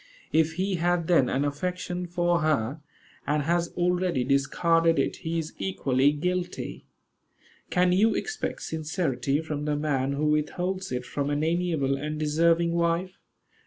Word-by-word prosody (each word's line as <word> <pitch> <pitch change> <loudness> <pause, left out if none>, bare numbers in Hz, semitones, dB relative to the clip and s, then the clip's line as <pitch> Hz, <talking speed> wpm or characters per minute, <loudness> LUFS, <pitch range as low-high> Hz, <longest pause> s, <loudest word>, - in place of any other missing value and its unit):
If 160 0 +3
he 185 +2 -1
had 175 0 +1
then 150 -8 +4
an 135 +3 0
affection 180 +4 -3
for 175 0 +1
her, 150 -3 0 0.5
and 150 0 +1
has 170 +2 +1
already 180 -5 +1
discarded 165 +5 +2
it, - - 0
he 165 +1 -3
is 160 -1 -3
equally 140 -7 +2
guilty. 180 +4 -3 0.8
Can 180 0 +3
you 210 +5 +3
expect 435 0 -3
sincerity 150 -4 -1
from 150 -2 -4
the 150 -1 0
man 140 -2 0
who 145 +2 -1
withholds 180 +5 -1
it 125 0 -3
from 145 0 -2
an 145 +1 0
amiable 160 -5 0
and 150 +2 -4
deserving 165 +2 +2
wife? 170 +2 0
165 Hz, 145 wpm, -27 LUFS, 145-175 Hz, 0.8 s, then